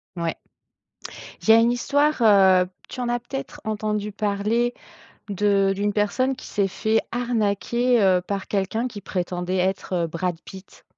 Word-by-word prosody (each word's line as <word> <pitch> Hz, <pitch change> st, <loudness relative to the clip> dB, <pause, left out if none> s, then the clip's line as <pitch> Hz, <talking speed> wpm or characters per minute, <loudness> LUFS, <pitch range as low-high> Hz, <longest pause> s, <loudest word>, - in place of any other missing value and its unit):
Ouais. 170 Hz, -2 st, -2 dB, 1.1 s
Il -, -, -8 dB
y -, -, +11 dB
a -, -, +8 dB
une 230 Hz, +1 st, +4 dB
histoire, 285 Hz, +3 st, +1 dB
heu, 190 Hz, -4 st, +6 dB, 0.2 s
tu -, -, -7 dB
en 245 Hz, -, -2 dB
as 240 Hz, 0 st, 0 dB
peut-être 270 Hz, +4 st, -7 dB
entendu 210 Hz, -1 st, -2 dB
parler, 210 Hz, +4 st, 0 dB, 0.6 s
de 200 Hz, -1 st, +2 dB
d'une 205 Hz, +1 st, -1 dB
personne 235 Hz, +6 st, 0 dB
qui -, -, -12 dB
s'est 200 Hz, -1 st, 0 dB
fait 220 Hz, +3 st, 0 dB
arnaquer, 235 Hz, +1 st, +1 dB
heu, 185 Hz, -2 st, +4 dB
par 195 Hz, +1 st, -4 dB
quelqu'un 210 Hz, +4 st, -1 dB
qui 215 Hz, -5 st, -9 dB
prétendait 180 Hz, -1 st, -3 dB
être 185 Hz, -1 st, -1 dB
Brad 170 Hz, +1 st, -3 dB
Pitt? 190 Hz, 0 st, -13 dB
205 Hz, 155 wpm, -23 LUFS, 190-235 Hz, 1.1 s, y